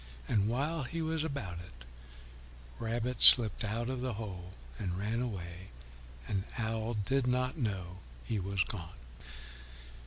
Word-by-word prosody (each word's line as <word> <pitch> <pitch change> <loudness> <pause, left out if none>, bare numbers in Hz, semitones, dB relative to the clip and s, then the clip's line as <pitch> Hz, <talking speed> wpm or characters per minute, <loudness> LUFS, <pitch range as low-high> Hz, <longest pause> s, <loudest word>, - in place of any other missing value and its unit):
And 105 -1 +3
while 145 +8 0
he 165 +6 -4
was 160 0 0
about 120 - -3
it, 65 -8 -11 0.9
Rabbit 120 +2 -2
slipped 115 -5 +8
out 110 +3 -1
of 130 -1 -2
the 125 -4 -1
hole 95 -4 -6 0.3
and 90 -2 -2
ran 110 +4 -1
away, 95 -6 -5 0.6
and 95 -2 0
Owl 110 0 -1
did 125 +5 +1
not 125 +1 +1
know 95 -6 -2 0.3
he 110 - -1
was 95 0 +1
gone. 85 - -6
110 Hz, 135 wpm, -33 LUFS, 95-125 Hz, 0.9 s, slipped